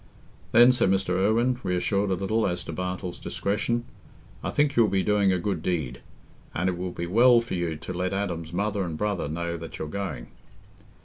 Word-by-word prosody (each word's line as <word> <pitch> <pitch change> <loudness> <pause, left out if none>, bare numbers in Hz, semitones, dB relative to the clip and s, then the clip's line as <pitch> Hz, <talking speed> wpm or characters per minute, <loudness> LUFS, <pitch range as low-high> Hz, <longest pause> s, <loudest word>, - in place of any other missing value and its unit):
"Then," 120 +2 +8
said 125 -6 +2
Mr. 95 -1 +1
Irwine, 110 +7 +2
reassured 100 +2 0
a 95 - +2
little 110 +4 0
as 90 -1 -2
to - - -6
Bartle's 90 -1 -4
discretion, 115 +4 -1 0.6
"I - - -1
think 145 -1 +1
you'll 115 -2 +5
be 95 -1 +1
doing 105 -2 +3
a 95 - +2
good 90 -2 -2
deed; 75 -8 -2 0.5
and 90 +3 0
it 90 - 0
will 90 +1 -3
be 85 -1 -4
well 120 +7 +6
for 115 - -5
you 85 -3 -1
to 75 - -7
let 90 +1 -1
Adam's 90 -5 -3
mother 100 +3 -1
and 85 -3 -4
brother 105 -5 -1
know 85 +2 -3
that 80 0 -8
you're 80 - -4
going." 75 -8 -5
95 Hz, 195 wpm, -26 LUFS, 85-105 Hz, 0.6 s, Then